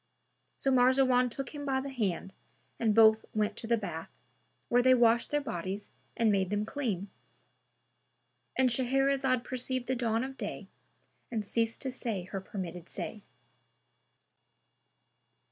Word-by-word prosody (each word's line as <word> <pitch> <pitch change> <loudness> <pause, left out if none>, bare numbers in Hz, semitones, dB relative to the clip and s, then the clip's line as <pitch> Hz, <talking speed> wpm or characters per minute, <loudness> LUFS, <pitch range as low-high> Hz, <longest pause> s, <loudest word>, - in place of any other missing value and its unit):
[FN#295] - - -15
So 270 - +3
Marzawan 255 0 +4
took 260 +3 -6
him 290 -1 -6
by 270 -2 +1
the 275 +1 -5
hand 195 -6 -2 0.5
and 220 -3 +2
both 220 -1 +7
went 210 -1 +1
to 225 - -5
the 235 0 +3
bath, 165 -6 -5 0.6
where 245 +1 +4
they 255 +1 +6
washed 235 -1 +4
their 295 - +1
bodies 195 -5 -4 0.3
and 225 -2 +4
made 190 -2 +1
them 205 +1 0
clean.—And 240 +2 -6
Shahrazad 265 0 +2
perceived 255 0 -3
the 260 - 0
dawn 230 -1 0
of 270 0 -6
day - - -6 0.6
and 220 -3 -2
ceased 230 +2 -1
to 265 - -2
say 225 -7 -3
her 190 +1 -5
permitted 180 -3 -6
say. 215 - -6
235 Hz, 140 wpm, -31 LUFS, 210-260 Hz, 0.6 s, both